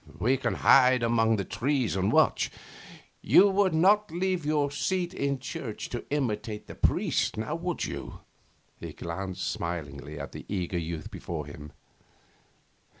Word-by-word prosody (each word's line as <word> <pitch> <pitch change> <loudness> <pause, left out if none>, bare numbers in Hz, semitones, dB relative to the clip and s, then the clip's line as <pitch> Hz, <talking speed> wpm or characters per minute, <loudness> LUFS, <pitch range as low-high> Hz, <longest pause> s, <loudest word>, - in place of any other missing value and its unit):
We 125 +5 +2
can 135 - -1
hide 130 -2 +5
among 115 -1 +3
the 100 -3 -2
trees 130 -4 0
and 95 +2 +1
watch. - - +3 0.7
You 200 - +6
would 195 -3 +2
not 205 +6 +4
leave 175 -1 -1
your 145 -2 +1
seat 180 +4 -1
in 140 -1 -1
church 125 -3 -6
to 120 - -4
imitate 110 -7 -2
the - - -9
priest, - - +1
would 165 +9 -2
you?' - - -7 0.6
He - - -7
glanced 95 +2 -5
smilingly 75 -4 -5
at 70 -2 -6
the - - -8
eager 90 -3 -2
youth 80 -1 -5
before 80 -4 -5
him. 75 0 -10
115 Hz, 145 wpm, -28 LUFS, 90-150 Hz, 0.7 s, You